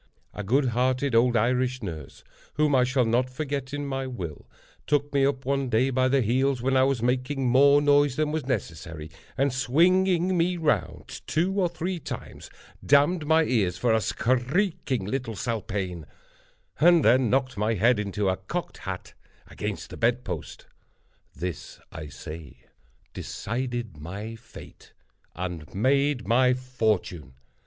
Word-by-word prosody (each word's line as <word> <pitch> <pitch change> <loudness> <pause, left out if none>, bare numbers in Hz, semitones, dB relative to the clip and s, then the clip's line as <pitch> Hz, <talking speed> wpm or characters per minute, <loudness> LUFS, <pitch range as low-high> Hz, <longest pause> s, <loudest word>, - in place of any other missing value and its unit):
A - - -5
good 130 +6 +2
hearted 130 +3 0
old 120 +1 +4
Irish 125 +2 0
nurse 80 -7 -7 0.3
(whom 150 -1 +2
I 130 -2 +5
shall 125 0 +1
not 120 +3 +1
forget 140 -1 -4
in 145 0 -3
my 135 -1 -3
will) 90 - -7 0.4
took 145 0 0
me 140 -1 +3
up 135 -2 -3
one 135 -1 0
day 125 +4 +2
by 130 0 +2
the 135 0 +2
heels, 130 +4 +1
when 130 +2 0
I 130 - +5
was 135 -4 0
making 130 +2 0
more 140 +3 +5
noise 145 -2 +4
than 150 +1 0
was 155 -4 -3
necessary, 80 - -4 0.3
and 135 -1 +1
swinging 175 +7 +3
me 175 +1 +1
round 135 - -2
two 175 +5 +1
or 180 -2 +2
three 175 +2 -4
times, - - -8 0.3
d—d 150 +4 +3
my 160 +1 +5
eyes 100 - 0
for 115 +3 +2
"a 110 - +2
skreeking 130 - 0
little 120 0 -3
spalpeen," 100 - -3 0.7
and 170 0 +5
then 120 +1 +4
knocked 130 +1 +1
my 105 +2 0
head 115 +3 +3
into 105 0 -2
a 95 0 +1
cocked 95 - -5
hat - - -6 0.4
against - - -5
the - - -8
bedpost. - - -2 0.7
This, 85 +1 -6
I 80 -1 -7
say, 75 -1 -10 0.5
decided 120 -5 -4
my 100 +9 -7
fate, 115 - -14 0.4
and 85 -3 -5
made 140 +4 +1
my 125 +2 +4
fortune. 110 - -2
125 Hz, 150 wpm, -26 LUFS, 110-140 Hz, 0.7 s, I